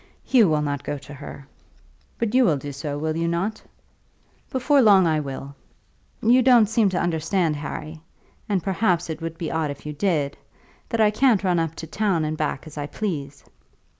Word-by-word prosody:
"Hugh 230 Hz, -8 st, +4 dB
will 150 Hz, -1 st, +1 dB
not 145 Hz, -1 st, -3 dB
go 145 Hz, -, -3 dB
to 140 Hz, -, -12 dB
her." 140 Hz, 0 st, -10 dB, 0.7 s
"But 230 Hz, -1 st, -1 dB
you 260 Hz, 0 st, +5 dB
will 160 Hz, -11 st, +3 dB
do 145 Hz, +1 st, -6 dB
so; 145 Hz, +1 st, -5 dB
will 155 Hz, +1 st, -2 dB
you 165 Hz, 0 st, -1 dB
not?" 180 Hz, +6 st, -2 dB, 0.9 s
"Before 275 Hz, +2 st, +3 dB
long 200 Hz, -5 st, +6 dB
I 155 Hz, -2 st, +2 dB
will. 140 Hz, -1 st, -6 dB, 0.7 s
You 245 Hz, +3 st, +5 dB
don't 245 Hz, -3 st, +6 dB
seem 220 Hz, -1 st, +2 dB
to 185 Hz, -, -1 dB
understand, 165 Hz, 0 st, 0 dB
Harry, 155 Hz, +2 st, -6 dB, 0.5 s
and, 190 Hz, -5 st, 0 dB
perhaps, 180 Hz, -4 st, 0 dB
it 160 Hz, +1 st, -6 dB
would 165 Hz, 0 st, -5 dB
be 165 Hz, -, -4 dB
odd 160 Hz, -2 st, -1 dB
if 140 Hz, +1 st, -8 dB
you 150 Hz, -, -4 dB
did, 150 Hz, -4 st, -1 dB, 0.5 s
that 230 Hz, -2 st, 0 dB
I 210 Hz, -1 st, +5 dB
can't 225 Hz, -2 st, +3 dB
run 180 Hz, -3 st, +2 dB
up 165 Hz, -1 st, -2 dB
to -, -, -7 dB
town 180 Hz, -2 st, 0 dB
and 155 Hz, +1 st, -2 dB
back 150 Hz, -2 st, -3 dB
as 155 Hz, -1 st, -9 dB
I 145 Hz, -, -3 dB
please. 145 Hz, -6 st, -4 dB
165 Hz, 195 wpm, -23 LUFS, 150-210 Hz, 0.9 s, long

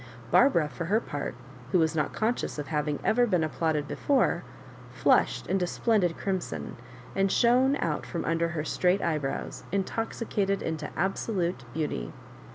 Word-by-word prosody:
Barbara, 170 Hz, -, +5 dB
for 165 Hz, +3 st, -5 dB
her 205 Hz, +6 st, +3 dB
part, 145 Hz, -10 st, -5 dB, 0.4 s
who -, -, +4 dB
was 160 Hz, -1 st, +2 dB
not 150 Hz, -, 0 dB
conscious 225 Hz, -4 st, -1 dB
of 145 Hz, -1 st, -5 dB
having 150 Hz, -1 st, 0 dB
ever 240 Hz, +2 st, +3 dB
been 180 Hz, -6 st, +2 dB
applauded 155 Hz, -2 st, 0 dB
before, 275 Hz, -, +1 dB, 0.5 s
flushed -, -, +2 dB
into 185 Hz, -2 st, 0 dB
splendid 190 Hz, -5 st, +1 dB
crimson, 190 Hz, -2 st, -3 dB, 0.4 s
and 195 Hz, 0 st, +2 dB
shone 255 Hz, +3 st, +4 dB
out 150 Hz, -, -2 dB
from 125 Hz, -, -3 dB
under 165 Hz, +3 st, +1 dB
her 170 Hz, -3 st, -3 dB
straight 180 Hz, +4 st, +1 dB
eyebrows, 150 Hz, -4 st, -2 dB
intoxicated 200 Hz, 0 st, -1 dB
into 155 Hz, -2 st, -3 dB
absolute 180 Hz, -, -1 dB
beauty. 145 Hz, -, -3 dB
175 Hz, 145 wpm, -28 LUFS, 155-205 Hz, 0.5 s, Barbara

